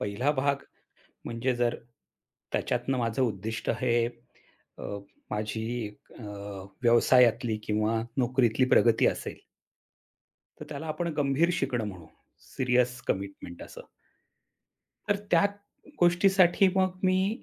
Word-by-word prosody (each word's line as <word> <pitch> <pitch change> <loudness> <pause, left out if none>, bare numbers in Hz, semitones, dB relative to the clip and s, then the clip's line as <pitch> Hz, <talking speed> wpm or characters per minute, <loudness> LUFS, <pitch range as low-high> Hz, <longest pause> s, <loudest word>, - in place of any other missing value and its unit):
पहिला 105 +8 0
भाग 140 0 +1 0.7
म्हणजे 120 +2 -1
जर 120 -1 +1 0.8
त्याच्यातनं 135 -1 -1
माझं 115 +2 0
उद्दिष्ट 110 -1 -2
हे 120 -2 +1 0.8
अ, - - -8 0.5
माझी 105 +1 -2 0.2
एक 105 0 -13
अ, - - -9 0.6
व्यवसायातली 120 -1 +4
किंवा 110 +1 +1 0.2
नोकरीतली 125 -1 +2
प्रगती 115 -2 +5
असेल - - -4 1.2
तर - - -8
त्याला 150 +1 -6
आपण 160 +2 -2
गंभीर 145 +4 +2
शिकणं 130 -9 -1
म्हणू. 90 -5 -10 0.5
सीरियस 125 -1 +1
कमिटमेंट 95 -2 -4
असं. - - -10 1.3
तर 205 - +3
त्याच 175 +4 +4 0.5
गोष्टीसाठी 185 +1 +5
मग 185 -1 +1
मी 190 +5 +1
125 Hz, 105 wpm, -28 LUFS, 115-160 Hz, 1.3 s, प्रगती